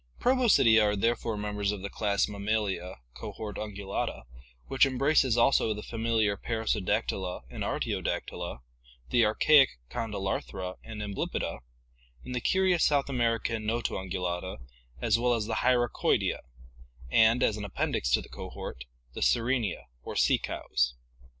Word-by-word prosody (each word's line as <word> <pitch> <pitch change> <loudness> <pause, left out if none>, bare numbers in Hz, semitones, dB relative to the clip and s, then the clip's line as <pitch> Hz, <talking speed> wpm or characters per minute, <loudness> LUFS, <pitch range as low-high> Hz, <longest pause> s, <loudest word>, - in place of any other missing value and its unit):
Proboscidea 205 - +5
are 105 0 +2
therefore 115 +1 0
members 105 -1 -1
of 100 -2 -6
the 100 - -3
class 100 -2 +1
Mammalia, 100 -3 -2 0.2
cohort 105 - -7
Ungulata, 100 - -4 0.4
which 135 0 +2
embraces 135 -2 +3
also 115 -2 +3
the 105 - -7
familiar 115 -3 0
Perissodactyla 100 - -1
and - - -4
Ar - - -1
tiodactyla, - - -3 0.5
the 120 - +4
archaic 135 - +5
Condylarthra 95 -4 -3
and 110 -2 -6
Amblypoda, 100 -10 -3 0.7
and 125 - -6
the 125 - -2
curious 185 +3 +2
South 140 -2 +2
American 115 -3 0
Notoungulata, 95 -5 -2 0.4
as 115 - +2
well 120 0 +2
as 110 -2 -2
the 110 0 -2
Hyracoidea, 120 -2 +2 0.7
and, 115 - +5
as 105 - +2
an 105 - -5
appendix 100 - -1
to - - +3
the - - -14
cohort, 65 - -7 0.3
the - - -7
Sirenia 120 -4 +1 0.2
or - - -7
sea - - +3
cows. 60 0 -1
110 Hz, 130 wpm, -29 LUFS, 100-120 Hz, 0.7 s, Proboscidea